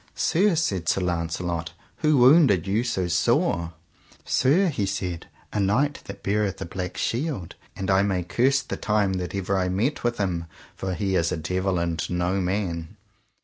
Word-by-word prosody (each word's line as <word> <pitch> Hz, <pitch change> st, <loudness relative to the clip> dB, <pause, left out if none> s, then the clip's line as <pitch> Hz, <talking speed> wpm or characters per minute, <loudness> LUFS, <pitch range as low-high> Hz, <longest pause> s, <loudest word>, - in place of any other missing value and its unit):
Sir, 190 Hz, +2 st, +2 dB
said 95 Hz, -, 0 dB
Sir 95 Hz, -, +2 dB
Launcelot, 85 Hz, -1 st, -2 dB, 0.2 s
who 155 Hz, -2 st, +3 dB
wounded 125 Hz, -, +6 dB
you 105 Hz, +4 st, +1 dB
so 105 Hz, -7 st, -1 dB
sore? 85 Hz, -1 st, +1 dB, 0.5 s
Sir, 160 Hz, +10 st, +3 dB
he 105 Hz, -10 st, -1 dB
said, 90 Hz, -3 st, -3 dB, 0.3 s
a 105 Hz, -, 0 dB
knight 125 Hz, +9 st, +1 dB
that -, -, -9 dB
beareth 100 Hz, -1 st, 0 dB
a -, -, -4 dB
black 90 Hz, +1 st, -5 dB
shield, 125 Hz, -, -2 dB, 0.2 s
and 95 Hz, 0 st, -2 dB
I 95 Hz, 0 st, +4 dB
may 95 Hz, -3 st, 0 dB
curse 130 Hz, +9 st, +2 dB
the -, -, -5 dB
time 105 Hz, -2 st, +1 dB
that 90 Hz, -, -5 dB
ever 100 Hz, 0 st, -1 dB
I 90 Hz, -1 st, +1 dB
met 110 Hz, +11 st, -1 dB
with 120 Hz, 0 st, 0 dB
him, 90 Hz, -4 st, -1 dB, 0.3 s
for 95 Hz, -1 st, -3 dB
he 95 Hz, +2 st, -1 dB
is 85 Hz, -2 st, +1 dB
a -, -, -1 dB
devil 90 Hz, +3 st, -1 dB
and 85 Hz, -2 st, -1 dB
no 90 Hz, +2 st, 0 dB
man. 90 Hz, -3 st, -2 dB
95 Hz, 175 wpm, -25 LUFS, 90-115 Hz, 0.5 s, wounded